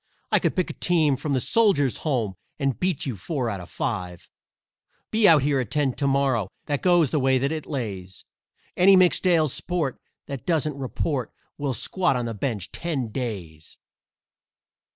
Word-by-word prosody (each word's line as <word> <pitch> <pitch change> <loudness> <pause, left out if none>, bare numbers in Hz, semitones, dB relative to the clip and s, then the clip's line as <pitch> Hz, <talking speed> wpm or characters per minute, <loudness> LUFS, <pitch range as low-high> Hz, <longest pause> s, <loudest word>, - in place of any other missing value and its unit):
I - - +5
could - - 0
pick 185 - 0
a - - -9
team 160 -6 +2
from 140 +2 -3
the 130 - +2
Soldiers' 175 - +2
Home 120 -10 -1 0.2
And 135 -4 -1
beat 185 -5 0
you 130 -5 -3
four 120 - -3
out 100 - -4
of 90 - -11
five. 90 -1 -4 0.8
Be 220 -1 +5
out 155 -4 +6
here 140 -1 +2
at 120 -5 -3
ten 145 -4 +1
to 140 - -1
morrow 135 -7 +1 0.2
That 145 -2 -2
goes 175 -6 +4
the 155 - +1
way 130 0 +3
that 135 +3 0
it 160 -2 -4
lays; 95 - -5 0.5
Any 190 +2 +6
mixed 185 0 +4
ale 165 -3 +4
sport 155 0 -2 0.3
that 140 -3 -7
doesn't 155 -3 +1
report 135 -1 -3 0.3
Will 140 -3 -1
squat 180 -1 +1
on 125 -1 -1
the 115 - -3
bench 105 -4 -3
ten 145 -9 -3
days!" 95 - -6
140 Hz, 175 wpm, -24 LUFS, 120-160 Hz, 0.8 s, out